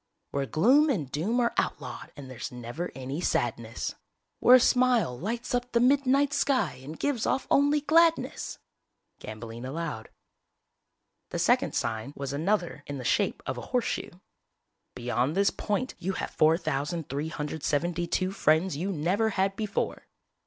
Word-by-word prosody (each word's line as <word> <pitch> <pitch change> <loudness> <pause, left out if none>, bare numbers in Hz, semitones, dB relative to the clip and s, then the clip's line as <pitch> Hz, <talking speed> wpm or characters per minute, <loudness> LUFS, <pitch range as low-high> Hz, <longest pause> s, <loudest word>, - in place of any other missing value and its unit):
Where 140 -1 -1
gloom 260 - +4
and 155 - -1
doom 205 - 0
are 235 - +1
outlawed - - -3
and 140 -3 -9
there's 130 -2 -6
never 125 +8 -5
any 135 +5 -4
sadness. 115 -7 -1 0.5
Where 250 - +8
a - - +8
smile 245 - +3
lights 225 - -4
up 245 0 -1
the 235 - +4
midnight 275 +2 +3
sky 260 - +1
and 150 +4 -8
gives 280 -6 -1
off 265 - 0
only 290 +1 +4
gladness! 330 +2 +2 0.6
(Gambling 115 +2 -8
allowed) 135 -4 -4 1.2
The - - -4
second - - +2
sign 115 +5 -2
was 140 0 -4
another 175 0 0
in 145 - -4
the 130 - -6
shape - - +1
of - - -3
a - - -9
horseshoe. - - -1 0.9
BEYOND 125 +4 -1
THIS 200 0 +4
POINT 220 +5 -2
YOU 190 +3 -2
HAVE - - -4
4372 160 +3 0
FRIENDS 165 -2 +2
YOU 180 +7 -2
NEVER 190 +7 +1
HAD 195 -1 0
BEFORE!!! 210 -1 -3
170 Hz, 140 wpm, -28 LUFS, -, 1.2 s, Where